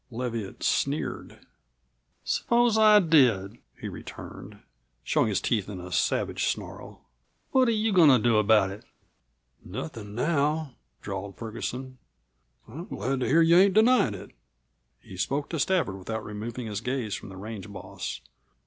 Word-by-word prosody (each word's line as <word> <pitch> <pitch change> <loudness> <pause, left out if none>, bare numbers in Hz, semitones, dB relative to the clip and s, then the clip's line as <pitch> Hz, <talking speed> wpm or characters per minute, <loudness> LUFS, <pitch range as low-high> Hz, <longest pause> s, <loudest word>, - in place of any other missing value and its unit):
Leviatt 115 -4 -5
sneered. - - -2 0.8
"Suppose 240 -1 +2
I 215 -1 +7
did?" 120 - +3 0.2
he - - -5
returned, - - -9 0.5
showing - - +2
his 100 -3 0
teeth 105 -4 -1
in 95 -3 -6
a 90 0 -9
savage - - 0
snarl. - - -5 0.5
"What 260 -1 +4
are - - +3
you 220 -1 +1
goin' 170 -5 +7
to 130 - +7
do 115 -1 +2
about 105 -2 +4
it?" 100 - -10 0.8
"Nothin' 105 +5 -7
now," 150 +1 0 0.3
drawled 95 0 -6
Ferguson. 125 +3 -6 0.7
"I'm 155 +10 -8
glad 130 +6 -2
to 125 - -1
hear 160 +5 +4
that - - +5
you 170 +1 +6
ain't 195 +1 +4
denyin' 220 - +4
it." 95 - -10 0.7
He 95 - -12
spoke 140 +9 -2
to 165 - -3
Stafford, 140 - 0
without 110 +4 -5
removing 115 +4 -6
his 105 -1 -4
gaze 125 -4 -2
from - - -6
the 95 - -10
range 105 0 -7
boss. 100 - -7
120 Hz, 150 wpm, -27 LUFS, 105-160 Hz, 0.8 s, I